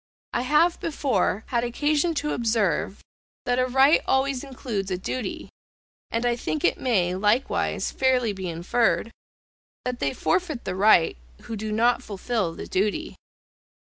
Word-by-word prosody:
I 240 - +1
have 300 +7 +3
before 255 - 0
had 235 -2 +1
occasion 295 +7 0
to 300 0 -1
observe, 215 -6 0 0.4
that 245 0 +1
a 255 - +2
right 270 +4 +5
always 265 0 +1
includes 240 -7 -4
a 185 - -1
duty, 205 +3 -4 0.6
and 230 +1 -1
I 240 -1 +2
think 155 -10 -3
it - - +2
may, 190 -9 +1
likewise 210 +7 0
fairly 255 -4 +1
be 190 -2 -5
inferred, 220 +7 0 0.7
that 250 -1 -3
they 140 - -1
forfeit 340 -9 -1
the 190 - -2
right, 190 - +4 0.3
who 225 - -6
do 215 0 -4
not 235 +3 +2
fulfil 205 -5 -2
the - - -7
duty. 210 - -1
235 Hz, 145 wpm, -25 LUFS, 200-265 Hz, 0.7 s, right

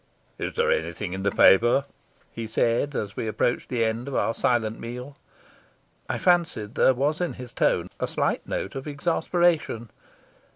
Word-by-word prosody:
"Is - - -3
there 470 0 +2
anything 105 - -2
in 95 - -4
the 100 - +2
paper?" 120 +8 +5 0.5
he 115 -1 -5
said, 115 +5 +1
as 105 -1 -3
we 115 - -3
approached 110 +3 -1
the 120 -3 +1
end 115 +3 -2
of 140 - -4
our 115 - +1
silent 115 -3 0
meal. 125 +4 -7 0.9
I - - -1
fancied 165 - +1
there 130 - +4
was 145 +6 0
in 175 - -1
his 125 -2 -10
tone - - +1
a - - -1
slight - - -1
note 95 - -3
of 135 +2 -6
exasperation. 160 - 0
120 Hz, 165 wpm, -25 LUFS, 110-145 Hz, 0.9 s, paper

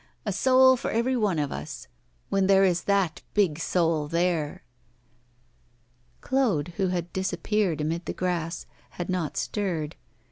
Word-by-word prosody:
a 205 - -1
soul 260 +5 +5
for 245 - -4
every 235 +3 +1
one 210 -8 +1
of 145 -2 -1
us, 75 +1 -7 0.4
when 195 -1 +2
there 195 0 +5
is 180 -2 +2
that 195 -5 +1
big 180 -7 +2
soul 165 -3 +1
there!' 165 -2 -1 1.6
Claude, 220 - +1
who 190 - +1
had 175 -1 -3
disappeared 190 -2 0
amid 165 +3 -2
the - - -1
grass, 170 -2 -2 0.3
had 175 - -4
not 175 -5 -2
stirred. 170 -7 -2
180 Hz, 140 wpm, -26 LUFS, 165-200 Hz, 1.6 s, soul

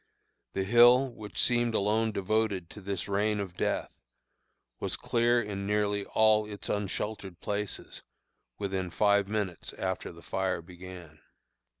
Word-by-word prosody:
The 95 - 0
hill, 120 +5 +6
which 105 -2 -7
seemed 120 -2 +2
alone 110 +2 +2
devoted 100 -3 0
to 105 - -10
this 100 -1 -3
rain 105 +1 +1
of 95 -3 -5
death, - - -1 0.9
was - - -1
clear 120 +1 +2
in 100 -3 -3
nearly 105 -1 +1
all 110 -1 +4
its 100 - -7
unsheltered 100 -2 -3
places 105 0 -4 0.6
within 95 -2 -2
five 100 +2 +3
minutes 100 -5 -3
after 95 -1 -3
the 85 0 -14
fire 95 -3 -1
began." 90 -2 -11
100 Hz, 130 wpm, -30 LUFS, 95-110 Hz, 0.9 s, hill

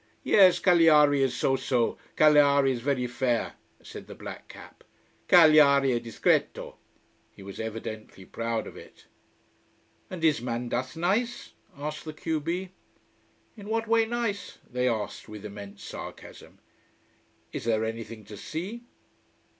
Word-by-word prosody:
"Yes 190 -3 +6
Cagliari 155 -5 +5
is 135 -2 +1
so 135 - +1
so 125 -3 0 0.2
Cagliari 140 -2 +5
is 120 -2 -3
very 130 -1 0
fair," 120 -1 -1 0.3
said - - -10
the - - -10
black - - -9
cap. - - -14 0.4
"Cagliari 150 -5 +6
è 120 -1 0
discreto." 115 -1 -1 0.6
He 100 - -13
was 100 0 -9
evidently 110 -3 -7
proud 115 +1 -3
of - - -10
it. - - -15 1.0
"And 180 -3 -7
is 155 -4 +3
Mandas 125 +3 -3
nice?" 210 +8 -1 0.3
asked 150 +2 -6
the 155 - -6
q 160 0 -2
b. 175 +4 -4 0.8
"In 205 -2 -10
what 225 0 -1
way 225 0 +3
nice?" 230 -4 -3
they 125 +1 -1
asked, 110 -1 -4
with 105 -1 -9
immense 100 -1 -10
sarcasm. - - -10 1.0
"Is - - -5
there 110 -1 +1
anything 115 -1 -7
to 105 - -10
see?" 185 - -6
140 Hz, 135 wpm, -27 LUFS, 115-165 Hz, 1.0 s, Yes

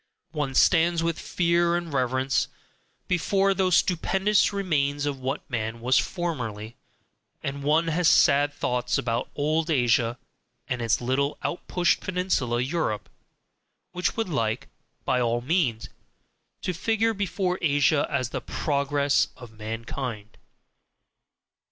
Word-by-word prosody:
One 145 -4 -3
stands 170 +1 +4
with 165 -1 -1
fear 170 0 +1
and 170 -3 -3
reverence 130 0 +1 0.6
before 195 +2 +2
those 185 -3 +3
stupendous 190 +4 +2
remains 145 -8 0
of 140 -2 -2
what 130 +3 -4
man 115 -2 -3
was 125 +3 +3
formerly, 120 - -4 0.7
and 140 +1 -4
one 155 +4 +2
has 165 +1 +2
sad 145 -2 +5
thoughts 125 -3 -1
about 120 +1 -2
old 155 +3 0
Asia 120 -4 +2 0.5
and 125 -1 -2
its 115 -1 +1
little 135 +4 0
out 175 - -3
pushed 175 -1 +2
peninsula 180 -10 0
Europe, 130 -6 -2 0.8
which 180 +4 -2
would 225 - 0
like, 115 -8 -2 0.4
by 125 - +1
all 120 0 +1
means, 125 -6 0 0.8
to 180 - -1
figure 225 +5 +1
before 190 -2 -1
Asia 145 -1 +3
as 130 -4 -1
the - - -3
"Progress 140 -1 +1
of 120 -3 -11
Mankind." 110 0 -6
145 Hz, 125 wpm, -26 LUFS, 125-175 Hz, 0.8 s, sad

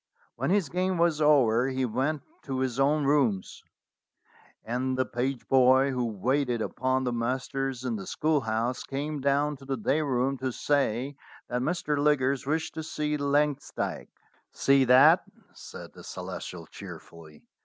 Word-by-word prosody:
When - - -2
his 195 -3 +2
game 185 +3 -1
was 165 -2 +2
over 130 -5 +4
he 130 -1 -1
went 135 +6 -1 0.2
to 135 -2 -3
his 130 -1 -2
own 145 +2 +2
rooms, 135 -9 +1 1.0
and 130 +3 -1
the 130 - +1
page 125 +1 -3
boy 130 +1 +5
who 125 -2 -1
waited 125 +4 0
upon 130 +3 -1
the 125 -1 -1
masters 130 +2 -2
in 120 -3 -1
the 95 - -8
schoolhouse 125 -5 0
came 145 +1 -4
down 140 +2 +1
to 135 - -14
the 135 -1 -2
day 140 +7 +1
room 135 -1 0
to 130 0 -2
say 135 0 0 0.3
that 125 0 -1
Mr. 150 0 -1
Liggers 140 -3 +1
wished 160 +2 -1
to 160 - -5
see 150 -1 -2
Langsdyke. 145 0 -1 0.4
"See 135 -1 +3
that?" 140 +8 +6 0.3
said - - -11
the - - -13
Celestial - - -7
cheerfully. 80 -2 -12
135 Hz, 150 wpm, -28 LUFS, 125-150 Hz, 1.0 s, that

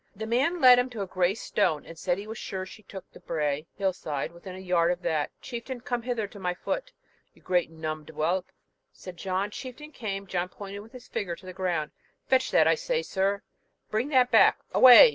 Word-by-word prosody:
The 220 +3 -5
man 270 +10 +1
led 250 -3 +8
him 250 +1 0
to 225 -5 -4
a - - -3
grey 185 0 +1
stone, 180 -9 0
and 165 - -10
said 175 +2 0
he 200 - -6
was 220 +1 -7
sure 185 -1 -4
she 200 +3 -12
took 190 -1 -10
the - - -14
brae 150 -1 -2
(hill 195 -2 +1
side) 150 -5 -4
within 175 +2 -10
a - - -8
yard 180 -2 +2
of 180 0 -3
that. 155 -2 0
'Chieftain, 245 +1 -6
come 245 0 -2
hither 235 -2 -1
to 205 - -12
my 180 -1 -1
foot, - - -3 0.4
you - - -22
great 180 -3 +1
numb'd 155 -1 -5
whelp!' 160 +4 -1 0.4
said 185 -1 -10
John. 190 +3 -2
Chieftain 270 +6 -8
came 200 -7 -4
John 180 -1 -2
pointed 200 +1 -8
with 220 +4 -13
his 250 -1 -11
finger 175 -4 -3
to 185 - -16
the 185 - -7
ground, 175 -5 -1 0.3
'Fetch 260 -1 +3
that, - - +5
I - - +6
say, - - -1
sir 195 +1 0 0.5
bring 220 +5 0
that 255 -4 +4
back - - +6 0.2
away!' 255 - +10
195 Hz, 220 wpm, -28 LUFS, 175-245 Hz, 0.5 s, away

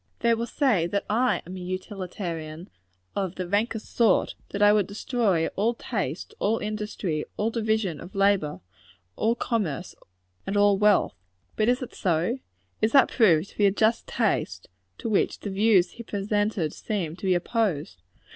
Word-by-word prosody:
They 235 - +4
will 230 +1 -1
say 225 - +2
that 200 +3 -2
I 245 +4 +2
am 180 +2 -8
a - - -6
utilitarian, 180 -3 -5 0.4
of 190 -2 -2
the 185 -1 -4
rankest 210 +3 -1
sort; 225 -5 +3 0.2
that 200 - -4
I 205 0 +7
would 210 -3 +2
destroy 200 -5 0
all 220 +4 +1
just - - -13
taste, - - -2
all 220 +2 +1
industry, 210 -7 -3
all 215 +2 0
division 220 -8 -1
of 180 - -11
labor, 195 -7 +2 0.5
all 230 +2 +1
commerce, 190 - -2 0.5
and 200 - -1
all 205 -1 +4
wealth. 210 -1 +4 0.4
But 215 +1 +2
is 250 +1 +1
it 250 - -8
so? 180 +7 0 0.4
Is 220 - +2
that 275 - +6
proved 185 -7 +3
to - - -23
be 205 - +6
a - - +3
just 220 +3 +1
taste, 145 - -1 0.3
to - - -5
which 215 -3 +1
the 205 - -5
views 195 -2 +3
here 235 - -9
presented 205 -4 -1
seem 180 -7 -3
to - - -7
be 185 - +4
opposed? 175 - -1
205 Hz, 170 wpm, -26 LUFS, 180-220 Hz, 0.5 s, I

